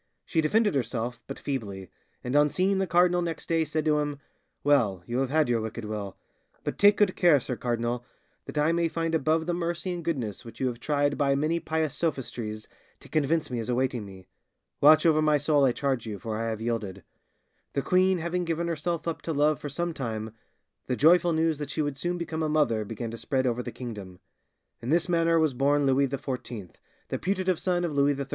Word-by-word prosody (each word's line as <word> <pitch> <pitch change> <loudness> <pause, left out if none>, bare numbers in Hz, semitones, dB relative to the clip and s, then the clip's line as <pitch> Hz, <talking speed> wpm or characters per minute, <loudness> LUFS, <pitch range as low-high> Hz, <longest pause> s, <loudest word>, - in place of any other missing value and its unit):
She 165 - +1
defended 210 +6 +2
herself 120 -2 -2
but 135 - -6
feebly, 100 -9 -5 0.3
and 125 +2 -2
on 145 0 +5
seeing 190 +4 +1
the 190 - 0
cardinal 175 0 +3
next 165 -2 -4
day 165 -1 +2
said 155 0 -2
to 150 -1 +3
him, 145 -1 -2 0.5
'Well, 115 -11 +2
you 120 +2 -2
have 135 -1 0
had 155 +1 +2
your 120 -2 +1
wicked 110 +1 -5
will; 105 -2 -5 0.5
but - - -4
take 205 0 +6
good 205 -3 +3
care, 170 -6 +5
sir 125 0 -4
cardinal, 120 0 -2 0.4
that - - -8
I 150 +2 +3
may 170 0 +2
find 165 0 -2
above 160 +1 +2
the 175 - -1
mercy 175 +1 -2
and 175 -1 -5
goodness 125 - -3
which 115 - -12
you 130 - 0
have 120 -1 -7
tried 145 +2 0
by 140 -1 +3
many 155 +4 +1
pious 155 -3 -1
sophistries 120 -9 -3 0.3
to - - -16
convince 155 0 0
me 120 - -2
is 115 - -4
awaiting 125 -2 0
me. 95 -2 -12 0.5
Watch 155 +3 +7
over 155 -2 +5
my 155 -1 +4
soul, 145 -1 +3
I 130 - +4
charge 130 -3 -1
you, 105 -2 -4
for 110 +3 -4
I 115 +1 -2
have 110 -1 -4
yielded!' 105 -5 -3 0.7
The 140 - -1
queen 185 +1 +3
having 170 +2 -2
given 170 0 -1
herself 170 0 -2
up 165 - -2
to 165 - -3
love 150 +1 +2
for 145 - -5
some 170 +4 -2
time, 110 -5 -4 0.6
the 125 - 0
joyful 170 +5 +5
news 160 -1 +1
that 145 -2 -4
she 155 - -1
would 145 -2 -3
soon 175 +2 -1
become 165 -2 -4
a 155 - 0
mother 145 -8 +2
began 115 +2 -5
to 115 - -7
spread 130 +3 0
over 125 -1 0
the - - -6
kingdom. 105 -7 -8 0.6
In 120 - -5
this 170 +3 +2
manner 165 -1 +3
was 155 -4 +2
born 140 +3 +2
Louis 135 +1 +3
XIV, 125 - -5 0.4
the - - -2
putative 185 -2 0
son 175 -1 0
of 165 - -3
Louis 140 0 +3
XIII. 140 0 -4
145 Hz, 215 wpm, -27 LUFS, 120-165 Hz, 0.7 s, Watch